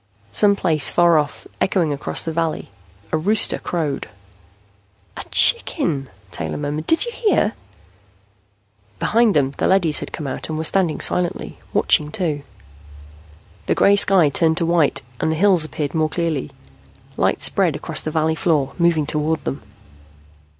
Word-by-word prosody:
Some 200 - +3
place 160 -7 +2
far 170 -2 +4
off, 145 -1 -5 0.2
echoing 170 -6 +1
across 140 - -1
the 165 - -3
valley, 165 -8 -3 0.4
a 160 - 0
rooster 205 +6 +3
crowed. 155 -6 -4 1.1
"A - - -7
chicken!" 165 - +2 0.2
Taylor 80 -2 -5
murmured. 150 +1 -4
"Did 325 +8 +3
you 475 - -5
hear?" 415 - 0 1.4
Behind 225 - +2
them, 140 -2 +1
the - - +1
leadys 180 -5 +3
had - - -7
come 155 - -6
out 135 +3 -4
and 155 - -3
were 160 - -3
standing 170 -1 +2
silently, 180 -1 -2
watching, 150 - +2
too. 160 -7 -2 1.3
The - - +1
gray 200 - +4
sky 190 -6 +4
turned 160 +2 +1
to 170 - 0
white 165 -5 +1 0.2
and 160 - 0
the - - -1
hills 185 -1 +3
appeared 150 -2 -5
more 155 -1 0
clearly. 165 -5 -3 0.7
Light - - 0
spread - - +2
across - - -3
the - - -4
valley 160 0 0
floor, 150 -4 0
moving 170 -3 +2
toward 150 +2 -1
them. 135 - -4
160 Hz, 150 wpm, -20 LUFS, 150-180 Hz, 1.4 s, far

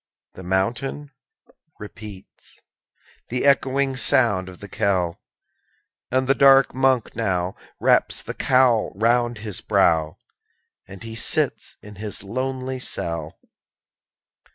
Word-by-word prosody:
The - - -11
mountain 115 +10 -2 0.7
repeats 105 -2 -11 0.7
The 125 +3 -1
echoing 140 -1 +2
sound 100 -8 +3
of 90 - -13
the 100 - -9
knell; 95 -4 -1 0.9
And 130 +1 0
the 135 - +4
dark 135 -1 +5
Monk 130 -2 +1
now 95 -5 -1 0.2
Wraps - - +2
the - - -6
cowl 125 -4 +2
round 120 +2 +1
his 105 -3 -4
brow, 80 -7 +1 0.7
_5 95 - -9
As 95 - -12
he 115 0 -8
sits 115 0 +1
in 105 -1 -12
his 105 -1 -5
lonely 130 +4 -4
cell. 85 -9 -4
115 Hz, 115 wpm, -22 LUFS, 95-130 Hz, 0.9 s, dark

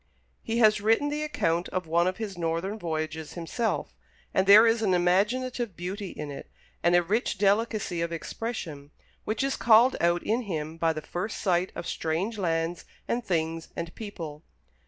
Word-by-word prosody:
He 230 0 -2
has 215 -3 +5
written 225 +7 +3
the 300 +1 -2
account 180 - 0
of 185 -1 -2
one 170 +2 +2
of 185 - -1
his 210 -4 -5
northern 170 +5 -2
voyages 160 -2 -4
himself; 215 +7 -2 0.4
and 190 0 +2
there 210 +3 +9
is 225 0 +3
an 190 -4 +3
imaginative 210 +5 +1
beauty 190 +3 -4
in 150 -3 -6
it, 140 - -9 0.3
and 175 +1 +4
a 175 - +5
rich 210 +5 0
delicacy 205 -3 +1
of 170 0 -2
expression, 165 -5 -5 0.4
which 215 +4 -1
is 275 0 0
called 235 +3 +5
out 170 +1 +2
in 230 +4 +1
him 160 -1 -3
by 165 0 +2
the 155 -1 -5
first 185 +8 -4
sight 180 -1 +1
of - - -5
strange 185 +8 -2
lands 165 -1 -1 0.2
and 240 +1 -1
things 165 -4 -1
and 165 0 -5
people. 165 -9 -7
185 Hz, 175 wpm, -27 LUFS, 165-220 Hz, 0.4 s, there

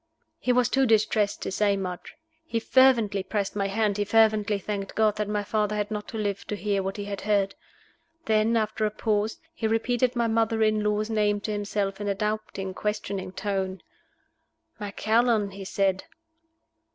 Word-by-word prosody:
He 250 - +1
was 250 -1 +3
too 270 0 +2
distressed 215 -2 +2
to - - -3
say 200 0 +2
much. 180 -2 -6 0.3
He 240 -8 -2
fervently 230 -5 +4
pressed 200 +1 -2
my 200 -1 0
hand; 205 0 0
he - - +3
fervently 215 -1 +3
thanked 200 0 -5
God 215 -1 +2
that 210 -1 -2
my 210 -1 -1
father 210 0 0
had 210 0 -2
not 210 -1 -4
lived 205 -2 -2
to 210 - -1
hear 200 -1 0
what 195 +1 -4
he 205 - -4
had 200 -1 -5
heard. 200 -1 +1 0.7
Then, 220 +1 +3
after 215 0 -1
a 215 - +3
pause, 215 0 -1 0.2
he 225 -8 -2
repeated 245 +3 +1
my 235 -1 +1
mother 225 0 +2
in 215 -1 +2
law's 210 +1 0
name 210 -1 +2
to 215 - -3
himself 205 -1 -2
in 205 - -3
a 200 - 0
doubting, 210 -2 -3
questioning 200 -2 -3
tone. 190 -1 -3 1.0
"Macallan?" 215 +1 +1
he 195 0 -8
said. 190 -1 0
210 Hz, 175 wpm, -26 LUFS, 200-220 Hz, 1.0 s, fervently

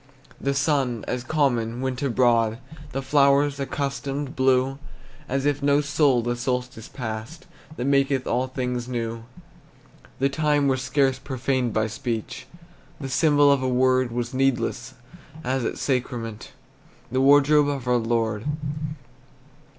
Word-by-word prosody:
The 140 0 -1
sun, 135 -5 0
as 125 -1 -2
common, 125 -6 0
went 130 -1 -3
abroad, 115 -4 +2 0.3
The 135 - -3
flowers, 140 0 +3
accustomed, 140 +1 -3
blew, 130 +1 +2 0.5
As 135 +1 -1
if 145 -1 +1
no 140 0 +3
soul 145 -4 +2
the 120 +1 -1
solstice 125 -1 -3
passed 115 +6 -6 0.3
That 125 - -2
maketh 140 -1 +2
all 125 +2 0
things 125 -2 -3
new. 115 -2 -4 0.9
The 135 - +2
time 145 0 +1
was 130 -1 +1
scarce 130 0 +1
profaned 130 -2 -1
by 110 0 +1
speech; 115 -1 -4 0.5
The 135 -2 -5
symbol 145 +1 +4
of 140 -2 +2
a 130 - 0
word 130 0 +2
Was 120 +1 -3
needless, 130 -2 -1 0.5
as 130 0 -1
at - - -2
sacrament 120 -4 -3 0.6
The 130 +1 +1
wardrobe 145 +2 +5
of 140 -3 -3
our 125 0 +3
Lord. 115 -1 -1
130 Hz, 135 wpm, -24 LUFS, 120-140 Hz, 0.9 s, wardrobe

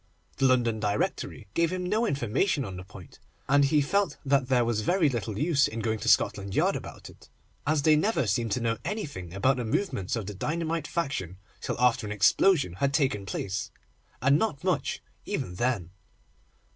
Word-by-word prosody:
The 135 - +2
London 120 -3 +2
Directory 105 -1 -2
gave 170 -1 +2
him 185 0 -3
no 215 +5 +1
information 140 - 0
on 95 -3 -6
the 90 - -7
point, 95 -2 -14 0.3
and 140 +1 +4
he 150 +1 +3
felt 200 +5 0
that 135 -1 +2
there 125 -2 +3
was 115 -2 0
very 175 - +2
little 115 -4 -3
use 145 0 +3
in 115 - -5
going 110 0 -1
to - - -1
Scotland 100 -1 +2
Yard - - +2
about - - -8
it, - - -16 0.4
as 150 -1 +2
they 155 0 +6
never 165 - +1
seemed 115 +2 0
to - - 0
know 115 -1 -1
anything 140 - -5
about 125 +8 +1
the 125 - -2
movements 110 - -1
of 115 -4 -3
the 105 - -6
dynamite 160 - -2
faction 115 - -3 0.2
till - - -3
after 125 -3 +2
an - - -5
explosion 105 - +3
had 140 +9 0
taken 105 -9 0
place, 95 +1 -3 0.5
and 140 +3 +5
not 170 -10 -1
much 185 -2 -1 0.2
even 90 - -3
then. 100 -4 -1
130 Hz, 185 wpm, -27 LUFS, 105-155 Hz, 0.5 s, they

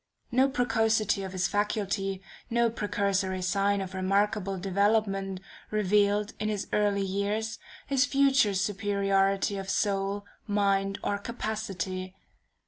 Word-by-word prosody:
No 260 +3 +4
precocity 225 -5 +1
of 190 -1 -5
his 185 -2 0
faculties, 200 -2 -1 0.3
no 235 0 +2
precursory 200 -3 -1
sign 200 +2 +1
of 190 -1 -6
remarkable 195 +1 0
development, 195 0 0 0.3
revealed, 210 0 +2
in 215 - -1
his 210 -2 -2
early 205 -1 +2
years, 205 +3 -2 0.3
his 275 -2 +2
future 275 -7 +3
superiority 195 0 +1
of 195 0 -5
soul, 200 0 0 0.2
mind, 195 -1 +1
or 200 - -1
capacity. 195 -4 -4
200 Hz, 115 wpm, -28 LUFS, 195-215 Hz, 0.3 s, No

